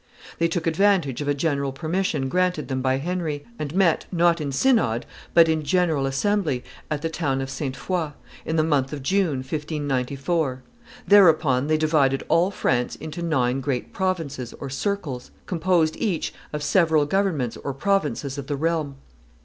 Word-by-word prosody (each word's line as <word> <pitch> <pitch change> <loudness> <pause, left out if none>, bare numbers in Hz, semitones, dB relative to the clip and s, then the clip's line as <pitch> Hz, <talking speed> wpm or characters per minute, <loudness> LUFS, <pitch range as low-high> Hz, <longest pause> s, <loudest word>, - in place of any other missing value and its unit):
They 170 - +3
took 165 0 -2
advantage 170 -5 +2
of 145 - -3
a 145 - +2
general 140 -2 0
permission 155 -1 -1
granted 180 0 0
them 130 -1 -1
by 130 0 +1
Henry, 155 -1 -3
and 150 +1 -4
met, 185 -5 +2
not 170 -2 +3
in 140 -2 -2
synod, 135 - +2 0.3
but 170 -1 +8
in 160 -1 +1
general 160 -4 +1
assembly, 150 -2 0 0.3
at 150 -1 -2
the 165 - 0
town 140 -5 -1
of 135 0 -4
Sainte 135 -1 -3
Foy, 170 -5 -2 0.3
in 160 - -2
the 155 - +3
month 145 -3 +1
of 140 -3 -5
June, 165 -5 +1
1594. 140 -1 -2 0.4
Thereupon 160 -9 +5
they 155 0 +3
divided 150 -4 +2
all 170 +3 +4
France 125 -10 0
into 155 +2 -7
nine 135 -6 +1
great 130 -2 -3
provinces 165 -10 -2
or 135 - -6
circles, 145 -5 -3 0.2
composed 170 -2 +1
each 195 -8 -1 0.2
of 150 -1 -4
several 160 -3 +3
governments 160 - 0
or 140 - -4
provinces 145 -3 -1
of 135 - -7
the 145 - -1
realm. 155 -2 -1
155 Hz, 165 wpm, -24 LUFS, 135-175 Hz, 0.4 s, but